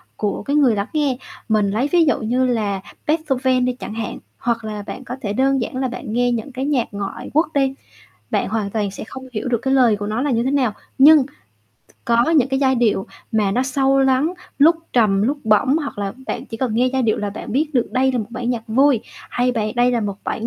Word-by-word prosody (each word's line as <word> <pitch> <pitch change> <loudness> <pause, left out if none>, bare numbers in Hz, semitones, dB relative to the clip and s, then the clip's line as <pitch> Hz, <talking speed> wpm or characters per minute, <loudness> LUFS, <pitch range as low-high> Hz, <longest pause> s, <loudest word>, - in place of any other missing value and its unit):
của 205 -1 -2
cái 280 +6 -1
người 270 -7 +4
lắng 200 0 -2
nghe. 290 -5 +1 0.3
Mình 210 -2 +2
lấy 225 +7 0
ví 345 -2 +5
dụ 295 - +2
như 245 +4 +1
là 210 -6 -1 0.3
Beethoven 265 -5 +1
đi 250 - 0
chẳng 245 -3 -8
hạn, 225 -1 -4 0.2
hoặc 230 -1 -1
là 210 -1 -5
bạn 265 - -7
có 250 0 -6
thể 205 -2 -2
đơn 270 +2 +2
giản 240 - -4
là 260 0 0
bạn 240 -3 -6
nghe 245 +1 +2
những 235 +3 -3
cái 260 +1 -3
nhạc 275 -5 +1
ngoại 200 -1 -5
quốc 310 +2 +3
đi, 270 -2 +2 0.6
bạn - - 0
hoàn 210 -1 -2
toàn 205 -2 -1
sẽ 195 - -8
không 260 +4 -9
hiểu 225 +2 -3
được 240 -2 +1
cái 265 0 +1
lời 245 -5 +4
của 205 0 -5
nó 215 +3 -2
là 290 - 0
như 230 -2 +1
thế 260 - 0
nào. 265 -6 +1 0.3
Nhưng 290 0 +7
t - - -18 0.7
có 235 +5 +3
những 290 -6 +4
cái 270 0 0
giai 265 -1 +3
điệu 225 -5 +1 0.3
mà 210 -3 +2
nó 245 +6 +1
sâu 270 +1 +2
lắng, 270 +6 +2 0.2
lúc 320 +4 +6 0.2
trầm, 205 -5 +3
lúc 275 +7 0
bổng, 220 +6 +3
hoặc 285 -8 -5
là 200 -1 -2
bạn - - -4
chỉ 225 - -7
cần 240 -2 -1
nghe 245 +3 +3
giai 265 -1 +1
điệu 220 -2 +1
là 205 -1 -2
bạn 210 - -7
biết 295 +5 +1
được 245 - +2
đây 260 +1 +2
là 250 - 0
một 215 - -3
bản 245 0 -3
nhạc 235 -2 -2
vui 260 +2 +3 0.3
hay 250 +1 +1
bầy 215 -2 -1
đây 245 0 +3
là 240 -2 +1
một 200 -2 -3
bản 225 - -3
245 Hz, 250 wpm, -20 LUFS, 220-270 Hz, 0.7 s, Nhưng